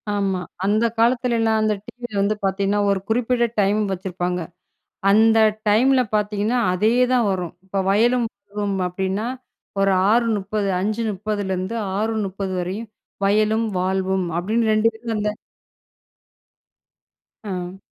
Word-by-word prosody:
ஆமா. 195 -2 0 0.2
அந்த 215 +3 +2
காலத்துலலாம் 230 -2 +2
அந்த 215 0 +2
டிவியில 240 -5 -6
வந்து 210 +2 +1
பார்த்தீங்கன்னா, 195 +1 +1
ஒரு 195 - +1
குறிப்பிட்ட 240 +1 +2 0.2
டைம் 200 +2 +2
வச்சிருப்பாங்க. 180 -1 -3 0.7
அந்த 225 +2 +5 0.3
டைம்ல 255 +6 +4
பார்த்தீங்கன்னா, 210 +3 0
அதே 210 +5 +2 0.2
தான் 245 -3 +3
வரும். 180 -3 -3
இப்போ 195 +1 -3
"வயலும் 235 +4 +3
வாழ்வும்" 200 0 -4
அப்டின்னா 190 +4 -2 0.5
ஒரு 195 0 +3 0.2
6:30, 215 -3 +1
5:30லிருந்து 205 -1 -2 0.2
6:30 205 -3 -2
வரையும் 195 +6 -4 0.4
"வயலும் 215 +3 +2
வாழ்வும்" 190 0 0
அப்படின்னு 220 +5 +1
2 215 +1 +4
பேரும் 225 0 -5
அந்த 210 0 0 2.1
ஆ. 185 -2 -5
210 Hz, 110 wpm, -22 LUFS, 190-225 Hz, 2.1 s, அந்த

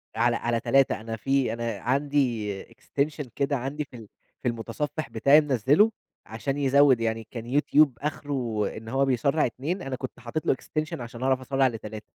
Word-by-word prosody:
على 120 +1 +3
على 120 0 0
3، 135 0 +2
أنا 115 0 -4
في 135 0 +1
أنا 115 -3 -3
عندي 125 -5 0
Extension 145 +5 -3
كده 140 0 0
عندي 135 +4 -3
في 130 - -13
ال 110 -2 -11 0.3
في - - -2
المتصفح 145 +6 -3
بتاعي 145 +3 +5
منزّله؛ 145 - +3 0.4
عشان 115 +5 -3
يزوِّد 140 -2 +4
يعني 115 -1 -2
كان 120 +4 0
YouTube 150 0 +5
آخره 135 -7 -2
إن 110 0 -8
هو 135 +3 +2
بيسرَّع 135 +4 +2
2، 150 +10 -3
أنا 135 -5 -4
كنت 130 -1 -7
حطيت 125 +6 -4
له - - +4
Extension 155 +3 -4
عشان 120 +1 -7
أعرف 130 0 +2
أسرَّع 135 +1 +2
ل3. 110 -3 -6
130 Hz, 175 wpm, -26 LUFS, 115-145 Hz, 0.4 s, بتاعي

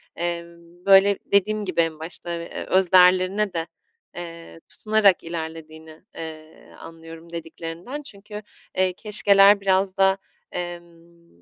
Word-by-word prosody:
emm, 170 +1 -6
böyle 195 0 +6
dediğim 210 +1 +1
gibi 180 -3 +1
en 160 -1 -2
başta 170 +1 -6
ve 170 - -7
öz 185 -2 +1
değerlerine 185 +2 +4
de, 165 0 -3 0.5
eee, 165 -1 -9
tutunarak 215 -3 +2
ilerlediğini, 160 -1 -8
eee, 160 -1 -10
anlıyorum 165 0 -12
dediklerinden 170 - -7
çünkü, 210 -5 -10 0.4
eee, 185 -1 +2
keşkeler 200 0 +4
biraz 190 0 +1
da, 195 0 +3 0.3
emm, 170 - -9
175 Hz, 115 wpm, -23 LUFS, 165-195 Hz, 0.5 s, böyle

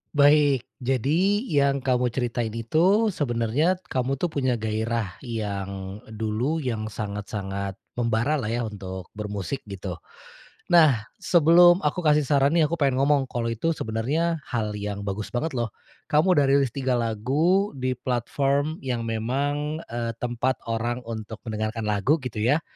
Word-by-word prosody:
Baik, 145 -2 +5 0.2
jadi 155 - +1
yang 140 - +1
kamu 125 -2 +2
ceritain 120 -2 -2
itu 185 - +3
sebenarnya 135 +4 +1 0.2
kamu 130 +1 0
tuh 165 +4 -2
punya 130 -4 +1
gairah 110 -2 -2
yang, 100 -4 -5
dulu, 110 +8 -2
yang 110 -4 -2
sangat-sangat 100 -2 -4 0.2
membara 120 +6 +1
lah 110 - -3
ya 120 +2 -1
untuk 95 -4 -7
bermusik 105 +4 -4
gitu. 95 -3 -6 0.7
Nah, 155 -10 +6 0.2
sebelum 175 0 +6
aku 150 +4 0
kasih 150 0 +4
saran 140 +1 +3
nih 165 - +5
aku 170 - -1
pengen 135 -2 +2
ngomong, 140 -2 +3
kalo 115 -2 -2
itu 165 +9 0
sebenarnya 150 +10 -1
hal 110 -4 -1
yang 100 0 -4
bagus 100 +1 -3
banget 155 +7 -1
loh. 120 -4 -2 0.3
Kamu 155 +5 +3
udah 140 - +5
rilis 135 -3 +3
3 130 -1 -1
lagu, 140 - +1
di 130 -1 -1
platform 140 +5 0
yang 125 -3 -1
memang, 140 +7 -1
eee, 115 -1 -2
tempat 125 +2 0
orang 120 +2 -1
untuk 110 -1 -6
mendengarkan 110 0 -3
lagu 105 +8 +2
gitu 125 -4 -6
ya. 140 +9 +2
125 Hz, 145 wpm, -25 LUFS, 110-145 Hz, 0.7 s, Nah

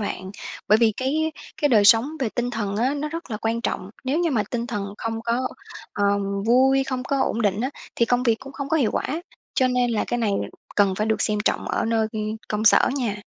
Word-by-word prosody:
bạn. 190 -2 -4 0.4
Bởi 215 +1 +6
vì 225 -2 +4
cái 310 +5 0 0.2
cái 290 - +2
đời 215 -5 +5
sống 230 +7 +6
về 245 - +1
tinh 240 +2 -2
thần 205 -4 -3
á, 255 +6 +1
nó 300 +1 -3
rất 330 -4 -7
là 215 - -2
quan 225 +2 -1
trọng. 190 -4 -3
Nếu 275 +5 0
như 340 -2 +1
mà 225 -6 +2
tinh 235 -1 -2
thần 205 -3 -4
không 225 0 -3
có, 240 +2 0 0.4
ờm, 200 -1 0
vui, 265 +3 +4
không 260 -2 -3
có 275 +1 -1
ổn 230 - -1
định 205 +1 +1
á, 260 +3 -1 0.3
thì 235 - +3
công 245 0 +2
việc 230 -3 +3
cũng 270 +1 -10
không 280 -1 -5
có 320 - +2
hiệu 250 -8 +2
quả. - - -1 0.5
Cho 255 -1 +3
nên 250 -1 +1
là 220 - 0
cái 240 - -1
này 215 -3 +1 0.4
cần 200 -2 +4
phải 215 +3 -1
được 220 - +1
xem 210 -1 +1
trọng - - 0
ở - - 0
nơi, 225 -1 +1
ư, 220 - -4 0.3
công 210 +1 -1
sở - - +6
nha. 210 -6 -2
230 Hz, 240 wpm, -23 LUFS, 210-260 Hz, 0.5 s, Bởi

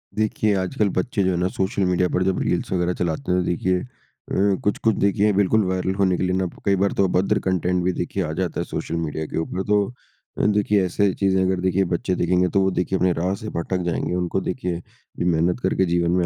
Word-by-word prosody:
देखिए 110 0 +1
आजकल 95 +2 0
बच्चे 100 +2 -1
जो 95 - +2
है 90 - -1
ना 90 - +1
सोशल 95 +1 0
मीडिया 90 0 +2
पर 90 - +2
जब 95 0 0
रील्स 90 - -1
वग़ैरह 90 -1 +1
चलाते 85 0 -1
हैं 90 - +3
तो - - -3
देखिए 90 +1 0
अ, - - -7 0.8
कुछ-कुछ 105 +2 +1
देखिए 100 +1 +2
बिल्कुल 100 +2 +3
वायरल 95 0 -1
होने 95 -2 +2
के - - -1
लिए 90 0 +1
ना 95 - 0 0.2
कई 100 -1 +3
बार 100 +1 +1
तो - - +4
अभद्र 90 +1 +1
कंटेंट 90 -1 +1
भी 90 - +2
देखिए 95 +2 -2
आ 80 - -3
जाता 90 -2 -2
है - - 0
सोशल 85 - -4
मीडिया 80 -1 -3
के - - -5
ऊपर 90 +3 -3
तो 105 -1 +3 0.5
अ, - - +1
देखिए 105 -1 +2
ऐसे 95 +2 +1
चीज़ें 95 -1 +1
अगर 95 0 +1
देखिए 95 +1 +2
बच्चे 90 +2 0
देखेंगे 90 +1 +2
तो 100 - +5
वो 95 0 +2
देखिए 95 +1 0
अपने 90 0 +2
राह 90 +3 -1
से 110 +1 -7
भटक 90 +2 -2
जाएँगे। 85 0 -1
उनको 90 +1 -1
देखिए 90 -6 -3 0.4
मेहनत 85 +3 +1
करके 95 - +2
जीवन 85 -1 +1
में 90 0 +2
95 Hz, 230 wpm, -22 LUFS, 90-100 Hz, 0.8 s, तो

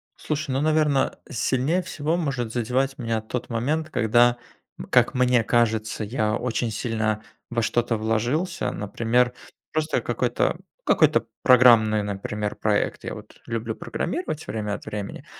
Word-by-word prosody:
Слушай, 155 -2 -3
ну, 135 +2 0
наверно, 155 -3 +2
сильнее 135 +9 +1
всего 165 -2 -2
может 135 -8 -2
задевать 125 +3 0
меня 115 -3 -1
тот 120 +3 -5
момент, 150 +8 -1
когда, 120 -1 +3 0.5
как - - +4
мне 125 -2 +3
кажется, 110 -2 +1
я 110 -1 0
очень 120 -1 -1
сильно 110 -1 -1 0.3
во 120 -1 0
что-то 115 0 0
вложился, 120 - -1
например, 115 +4 +1 0.4
просто 155 0 0
какой-то - - 0 0.3
какой-то - - +4 0.2
программный, 115 -4 +6
например, 105 +1 -3
проект. 105 -1 0
Я - - -4
вот - - -12
люблю 115 -1 -3
программировать 325 - -4
время 105 0 -3
от - - -11
времени, 105 -1 -6
120 Hz, 135 wpm, -24 LUFS, 110-135 Hz, 0.5 s, программный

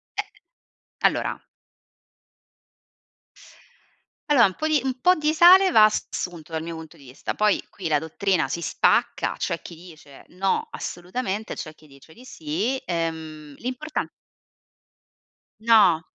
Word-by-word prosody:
Eh, - - -4 0.7
allora - - 0 2.9
Allora, 255 -7 +6
un 190 - -1
po' 310 - -2
di 310 -2 +3
un 260 -1 -3
po' 365 +1 +5
di 305 0 0
sale 370 +3 +7
va 215 - +7
assunto 175 -6 -1
dal 160 0 -2
mio 165 0 -6
punto 160 0 -11
di 145 - -18
vista, 130 +1 -6
poi 210 -1 +2
qui 180 -5 -6
la 150 -2 +2
dottrina 160 0 -1
si 170 +5 -4
spacca, - - +1
c'è 170 - -3
chi 170 - -10
dice: 160 -5 -15
"No 190 +2 -1
assolutamente". 195 +4 -5
C'è 155 -2 -8
chi 155 - -20
dice 140 +3 -18
di 250 - -16
sì, 205 - -3
ehm, 160 -3 -4
l'importa 255 +5 -4 1.6
No, 210 -8 +5
180 Hz, 135 wpm, -24 LUFS, 160-245 Hz, 2.9 s, sale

